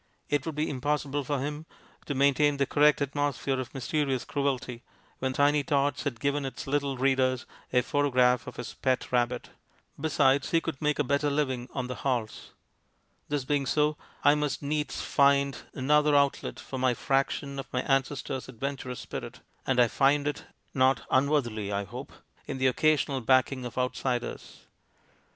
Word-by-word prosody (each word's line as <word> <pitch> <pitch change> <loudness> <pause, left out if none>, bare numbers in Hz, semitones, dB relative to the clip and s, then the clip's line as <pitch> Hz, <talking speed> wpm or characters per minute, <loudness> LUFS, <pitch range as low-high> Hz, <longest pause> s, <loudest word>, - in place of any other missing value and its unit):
It 145 +1 0
would 160 - -3
be 150 +1 0
impossible 145 +1 -1
for 145 +2 -1
him 150 +4 -4 0.4
to 145 - -2
maintain 140 +1 +3
the 140 - +2
correct 150 +1 +4
atmosphere 140 -1 -1
of 130 - -5
mys 135 -3 -6
terious 140 -5 0
cruelty 130 -4 -2 0.4
when 130 0 -1
Tiny 145 +2 +3
Tots 145 -2 0
had 125 -5 -2
given 140 +2 0
its 135 - -5
little 140 -1 -1
readers 130 -1 +1 0.3
a 125 - +3
photograph 125 -4 +2
of 125 - -7
his 115 - -6
pet 130 -1 -1
rabbit. 125 0 0 0.5
Besides, 145 -2 +2
he 165 - +3
could 165 -4 -5
make 150 -1 +1
a 150 - +2
better 140 +2 +1
living 130 -4 -1
on 130 -2 -3
the 125 - -4
"halls." 120 -5 -2 0.8
This 145 -3 -1
being 140 -1 0
so, 150 0 +2 0.3
I 145 - +7
must 150 -1 -1
needs 150 +1 -2
find 140 -1 +3 0.2
another 150 +2 +3
outlet 140 -1 +1
for 130 - -6
my 125 -1 +2
fraction 140 +1 -1
of 135 - -7
my 125 - -1
ancestor's 135 -1 -1
adventurous 130 0 -5
spirit, - - -7 0.3
and 130 -2 +2
I 120 - +6
find 140 +4 +2
it, 145 - -3 0.3
not 130 -2 +2
unworthily 130 -7 +1
I 100 0 -1
hope, 100 - -8 0.4
in - - -4
the 130 - 0
occasional 140 0 +2
backing 130 +1 +2
of 120 - -7
outsiders. 125 -1 -3
135 Hz, 165 wpm, -28 LUFS, 130-145 Hz, 0.8 s, I